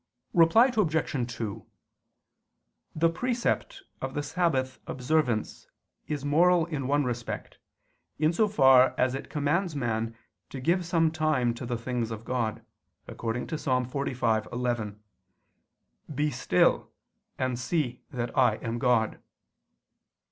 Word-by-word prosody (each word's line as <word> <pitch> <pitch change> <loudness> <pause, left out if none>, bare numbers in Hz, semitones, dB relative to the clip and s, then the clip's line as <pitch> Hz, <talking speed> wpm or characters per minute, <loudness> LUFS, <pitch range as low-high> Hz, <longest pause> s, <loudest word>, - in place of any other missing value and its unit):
Reply 200 +10 +6
Obj. 155 - 0
2: 110 -4 -4 1.3
The 165 +1 +3
precept 245 - -2 0.2
of 135 0 -4
the 145 - -1
Sabbath 135 -7 0
observance 125 -3 -1 0.4
is 145 -2 -3
moral 170 +3 +4
in 150 -6 -4
one 145 +1 +2
respect, 120 -2 -5 0.6
in 155 +2 +2
so 215 +5 +3
far 130 -8 +5
as 130 0 +2
it 135 - -6
commands 155 +4 0
man 115 -3 -2 0.3
to 135 - -7
give 170 +6 +1
some 165 -2 +2
time 155 -7 +1
to 120 +1 -7
the 120 -1 -2
things 120 -1 -3
of 110 0 -7
God, 120 -4 -2 0.4
according 115 +1 -3
to 155 - -4
Ps. - - -10
45:11: 120 -3 -1 1.2
"Be 150 +2 +1
still 120 -8 +2 0.5
and 130 -2 -1
see 130 -3 -1
that 120 -1 -4
I 125 -5 +4
am 115 +1 -4
God." 115 -3 +1
130 Hz, 125 wpm, -28 LUFS, 120-160 Hz, 1.3 s, Reply